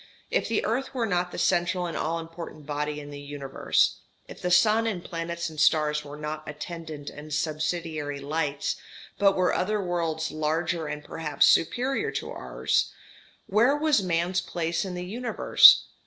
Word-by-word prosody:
If - - +1
the 225 - 0
earth 260 +5 -2
were 240 -3 +1
not 180 -3 0
the - - -7
central 175 0 +1
and 170 - -4
all 165 +1 -1
important 165 -2 -8
body 150 0 -3
in 145 0 -9
the 145 - -8
universe, 140 -1 0 0.3
if - - -11
the 180 - -1
sun 220 +5 +4
and 185 -6 -3
planets 170 0 -4
and 155 -2 -8
stars 150 -1 +3
were 145 0 -9
not 150 +1 -4
attendant 155 -1 -7
and 150 +1 -10
subsidiary 155 -1 -2
lights, 145 0 -2 0.4
but 195 -1 +4
were 185 -1 +2
other 210 +3 0
worlds 165 -4 -2
larger 160 +2 -1
and 150 0 -5
perhaps 150 -3 +1
superior 265 - +2
to - - -4
ours, - - -1 0.5
where 235 +8 +3
was 300 -6 +3
man's 180 0 0
place 170 +2 -2
in 185 -2 -5
the 180 0 -5
universe? 235 +5 +6
165 Hz, 165 wpm, -26 LUFS, 150-185 Hz, 0.5 s, universe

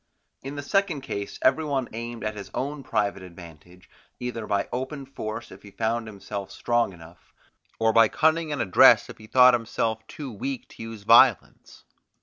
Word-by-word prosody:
In 135 +2 -7
the 145 - -5
second 195 -2 0
case 100 -5 -5
every 135 +5 +3
one 135 -4 -1
aimed 115 +1 -6
at 110 0 -2
his 100 -2 -8
own 145 +2 -3
private 100 -6 -1
advantage, 90 0 -14 0.3
either 120 -3 -5
by 100 -1 0
open 130 +3 -4
force 115 -4 -7
if - - -13
he 100 - -13
found 115 +2 -2
himself 100 -1 -7
strong 120 -3 0
enough, 85 -1 -16 0.4
or 110 0 +2
by 115 0 +6
cunning 160 +4 +1
and 145 -4 -1
address 95 - +6
if - - -15
he 110 - -13
thought 125 +2 +6
himself 115 -1 -1
too 140 -4 -8
weak 130 +5 -5
to - - -13
use 115 -2 -8
violence. 115 +1 +3
115 Hz, 175 wpm, -25 LUFS, 100-135 Hz, 0.4 s, by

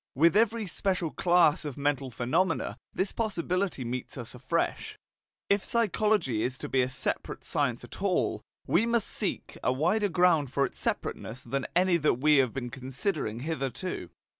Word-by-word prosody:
With 165 +7 +5
every 225 0 +3
special 185 -3 -1
class 175 -2 +3
of 145 -3 -5
mental 140 -2 0
phenomena 155 - 0
this 190 +1 -1
possibility 185 - -1
meets 125 +3 -5
us 120 -3 -6
afresh. 130 +7 -2 0.5
If 200 0 +2
psychology 210 - +1
is 125 +3 -1
to - - -5
be 130 - +2
a 125 - 0
separate 130 - -3
science - - 0
at - - -10
all, - - +1 0.2
we 215 +7 +2
must 235 -2 +2
seek - - -3
a - - +3
wider 180 +10 +1
ground 165 -6 +3
for 140 0 +2
its - - -6
separateness 125 +4 -3
than 135 +2 -2
any 180 0 +4
that 155 -5 +2
we 150 +4 +4
have 130 -3 +3
been 125 -1 -5
considering 130 - -3
hitherto. 135 - -3
155 Hz, 165 wpm, -29 LUFS, 130-185 Hz, 0.5 s, With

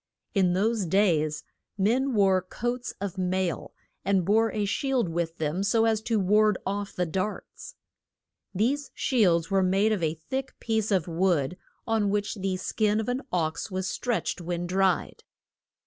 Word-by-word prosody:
In 185 -3 +3
those 210 +1 +1
days 160 -5 +2 0.3
men 245 +6 +1
wore 190 -2 +4
coats 240 +6 -4
of 195 -1 -4
mail, 185 -1 -1 0.3
and 195 -2 +2
bore 220 +3 +3
a 210 -1 -1
shield 250 0 0
with 165 0 -2
them 160 +4 -1
so 225 +3 +3
as 220 -1 +2
to 225 0 0
ward 210 +1 +3
off 200 +1 -3
the 180 - 0
darts. 195 - -5 0.8
These 260 +9 0
shields 190 - +2
were 195 0 +3
made 195 +4 +2
of 210 -4 0
a 160 -1 0
thick 260 +12 -5
piece 220 -2 0
of 185 -5 +1
wood, 170 -3 +1 0.3
on 220 -3 +1
which 205 0 0
the 190 -2 -2
skin 210 +3 0
of 220 - -2
an 250 +2 -1
ox 160 +2 -1
was 190 -1 -2
stretched 235 -2 -2
when 175 0 -3
dried. 190 0 0
195 Hz, 160 wpm, -27 LUFS, 180-220 Hz, 0.8 s, wore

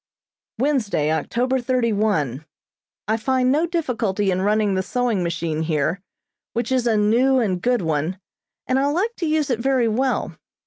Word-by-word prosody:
Wednesday, 220 - +1
October 245 - 0
thirty 245 -2 0
one: 160 - 0 0.6
I 220 +1 +1
find 255 +2 +1
no 310 +5 +2
difficulty 230 - -1
in 185 0 0
running 210 0 +2
the 190 - +1
sewing 240 -1 -1
machine 170 -2 -2
here, 160 +3 -1 0.5
which 235 +3 -2
is 255 -2 +1
a 225 -2 +2
new 240 +6 +3
and 190 -7 0
good 245 -5 +1
one, 160 +3 -1 0.5
and 260 +1 +1
I 275 - +2
like 380 +11 0
to 340 - -2
use 305 -3 +1
it 235 - 0
very 260 -1 +2
well. 255 +4 -1
230 Hz, 165 wpm, -22 LUFS, 185-260 Hz, 0.6 s, new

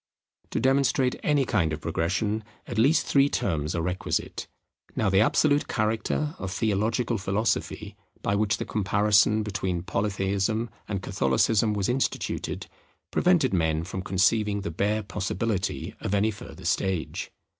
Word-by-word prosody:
To - - -1
demonstrate 130 -1 +2
any 145 -3 +2
kind 95 -10 +1
of 75 - -3
progression, 95 +7 -1 0.2
at - - -3
least 145 +7 +4
three 140 0 +4
terms 80 - -1
are 85 - -1
requisite. 90 +2 -2 0.5
Now 105 -3 +1
the 95 - +4
absolute 145 +3 +3
character 110 +8 -1
of 95 - -4
theological 110 +3 0
philosophy, 100 +4 -1 0.3
by 100 - +1
which 105 +1 +1
the - - -4
comparison 105 +1 +3
between 95 -4 -2
Polytheism 100 +3 -1 0.2
and 100 -3 -3
Catholicism 100 - +2
was 100 -2 0
instituted, 130 +2 -2 0.5
prevented 175 - +3
men 80 -2 +1
from 95 +2 -5
conceiving 100 +2 +1
the 85 - -4
bare 105 +6 0
possibility 100 0 -2
of 100 - -1
any 105 +2 +2
further 105 - -11
stage. 95 -4 -1
105 Hz, 135 wpm, -26 LUFS, 95-110 Hz, 0.5 s, least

